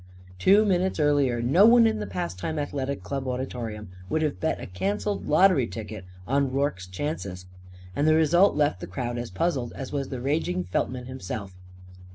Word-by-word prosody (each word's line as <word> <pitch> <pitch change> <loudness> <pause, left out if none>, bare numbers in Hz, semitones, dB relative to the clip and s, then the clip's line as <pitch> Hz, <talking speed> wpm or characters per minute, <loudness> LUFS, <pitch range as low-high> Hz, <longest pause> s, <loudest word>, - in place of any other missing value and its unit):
Two 200 - +5
minutes 190 -2 +1
earlier, 140 -5 +2
no 170 - +6
one 235 0 +7
in 220 - +1
the 105 - -4
Pastime 90 - -4
Athletic 140 -1 -3
Club 135 -2 -4
auditorium 120 -5 -4 0.2
would 160 +6 0
have 150 -2 -1
bet 160 - -1
a - - -6
cancelled 100 - -2
lottery 185 -11 +4
ticket 105 -4 -7 0.2
on 135 +2 +1
Rorke's 135 -9 -1
chances. 95 - -5 0.5
And 145 - +1
the 155 - +5
result 170 +5 +4
left 145 -10 +1
the - - -7
crowd 120 +7 -4
as 120 - -5
puzzled 125 - -1
as 135 - -7
was 140 -2 -3
the 130 - -4
raging 125 - -1
Feltman 125 +7 -2
himself. 100 -6 -6
130 Hz, 175 wpm, -26 LUFS, 105-155 Hz, 0.5 s, one